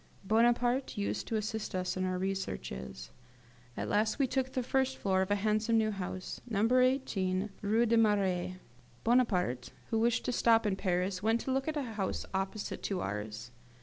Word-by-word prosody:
Bonaparte 240 Hz, +5 st, +2 dB
used 205 Hz, -, -2 dB
to 225 Hz, -, -2 dB
assist 215 Hz, -1 st, -3 dB
us 185 Hz, 0 st, -1 dB
in 185 Hz, 0 st, -1 dB
our 185 Hz, 0 st, -1 dB
researches. 65 Hz, -, -4 dB, 0.7 s
At -, -, -2 dB
last 215 Hz, +1 st, +1 dB
we 275 Hz, -, +3 dB
took 260 Hz, +1 st, -1 dB
the 255 Hz, -, 0 dB
first 265 Hz, +1 st, +1 dB
floor 190 Hz, -1 st, +1 dB
of 190 Hz, -, -1 dB
a 205 Hz, -, +3 dB
handsome 215 Hz, +2 st, +1 dB
new 215 Hz, -1 st, +2 dB
house, 185 Hz, -2 st, -5 dB
No. 210 Hz, -2 st, +1 dB
19 225 Hz, -6 st, +2 dB
Rue 220 Hz, +3 st, +3 dB
des 230 Hz, 0 st, +3 dB
Marais. 195 Hz, -5 st, +2 dB, 0.5 s
Bonaparte, 185 Hz, -, +2 dB, 0.2 s
who 225 Hz, -, +2 dB
wished 230 Hz, 0 st, +2 dB
to -, -, 0 dB
stop 230 Hz, -2 st, +4 dB
in 200 Hz, -2 st, +1 dB
Paris, 185 Hz, 0 st, -1 dB
went 225 Hz, +2 st, +2 dB
to 265 Hz, -, -3 dB
look 270 Hz, +2 st, 0 dB
at 310 Hz, -1 st, -1 dB
a 290 Hz, -, 0 dB
house 215 Hz, -6 st, -3 dB
opposite 195 Hz, +2 st, -3 dB
to 195 Hz, -2 st, -2 dB
ours. 105 Hz, +4 st, -4 dB
210 Hz, 180 wpm, -32 LUFS, 185-235 Hz, 0.7 s, stop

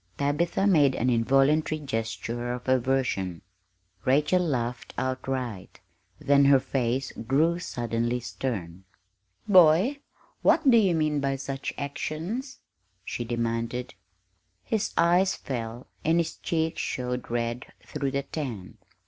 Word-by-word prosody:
Tabitha 155 Hz, +7 st, 0 dB
made 150 Hz, -9 st, +4 dB
an 125 Hz, +2 st, +1 dB
involuntary 135 Hz, +6 st, +3 dB
gesture 120 Hz, -2 st, -3 dB
of 125 Hz, +1 st, -7 dB
aversion. 125 Hz, -9 st, 0 dB, 0.6 s
Rachel 150 Hz, +7 st, +3 dB
laughed 125 Hz, -7 st, -2 dB
outright; 130 Hz, -6 st, -3 dB, 0.4 s
then 140 Hz, 0 st, +4 dB
her 140 Hz, -1 st, +6 dB
face 130 Hz, 0 st, -1 dB
grew 155 Hz, +9 st, +1 dB
suddenly 120 Hz, -5 st, -2 dB
stern. 100 Hz, -8 st, -5 dB, 0.6 s
"Boy, 185 Hz, -, +5 dB, 0.4 s
what 320 Hz, -3 st, +3 dB
do 250 Hz, -, +7 dB
you 195 Hz, -6 st, +4 dB
mean 155 Hz, -2 st, +1 dB
by 135 Hz, -1 st, 0 dB
such 135 Hz, 0 st, -4 dB
actions?" 165 Hz, -, -4 dB, 0.5 s
she 120 Hz, -, -3 dB
demanded. 115 Hz, +1 st, -2 dB, 0.7 s
His 220 Hz, -2 st, -1 dB
eyes 175 Hz, +3 st, +4 dB
fell, 120 Hz, -1 st, -5 dB, 0.2 s
and 165 Hz, +2 st, +3 dB
his 165 Hz, -1 st, -1 dB
cheeks 160 Hz, -1 st, -1 dB
showed 125 Hz, -1 st, -3 dB
red 120 Hz, 0 st, -2 dB, 0.2 s
through 145 Hz, -2 st, -2 dB
the 140 Hz, +1 st, -2 dB
tan. 120 Hz, -, -6 dB
135 Hz, 115 wpm, -27 LUFS, 120-155 Hz, 0.7 s, do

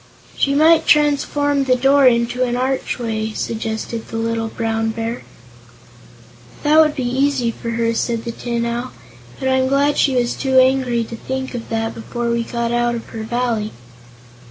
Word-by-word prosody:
"She 275 Hz, 0 st, +1 dB
might 320 Hz, +2 st, +5 dB
transform 290 Hz, -1 st, +2 dB
the 255 Hz, -1 st, +3 dB
door 270 Hz, +2 st, +4 dB
into 240 Hz, +1 st, +2 dB
an 245 Hz, -1 st, +1 dB
archway," 235 Hz, -4 st, -2 dB
suggested 225 Hz, +1 st, -4 dB
the 225 Hz, -, -5 dB
little 225 Hz, 0 st, -1 dB
Brown 225 Hz, 0 st, -2 dB
Bear. 230 Hz, +2 st, -4 dB, 1.4 s
"That 305 Hz, +1 st, +5 dB
would 305 Hz, -1 st, +4 dB
be 255 Hz, -3 st, -2 dB
easy 260 Hz, -1 st, +1 dB
for 230 Hz, -, -7 dB
her," 230 Hz, 0 st, 0 dB
said 230 Hz, 0 st, -1 dB
the 235 Hz, -, -3 dB
Tin 235 Hz, 0 st, -3 dB
Owl; 240 Hz, +2 st, -3 dB, 0.5 s
"but 265 Hz, -, -2 dB
I'm 260 Hz, 0 st, +2 dB
glad 280 Hz, +2 st, +2 dB
she 270 Hz, -2 st, +3 dB
was 240 Hz, -1 st, +1 dB
too 265 Hz, -1 st, 0 dB
angry 255 Hz, -2 st, +2 dB
to 230 Hz, -, -8 dB
think 265 Hz, +3 st, -5 dB
of 235 Hz, -2 st, -6 dB
that 225 Hz, 0 st, -2 dB
before 235 Hz, +1 st, -4 dB
we 235 Hz, 0 st, 0 dB
got 235 Hz, 0 st, -3 dB
out 240 Hz, 0 st, +1 dB
of 230 Hz, -, -7 dB
her 225 Hz, -, -6 dB
Valley." 225 Hz, -1 st, -2 dB
240 Hz, 170 wpm, -19 LUFS, 230-265 Hz, 1.4 s, might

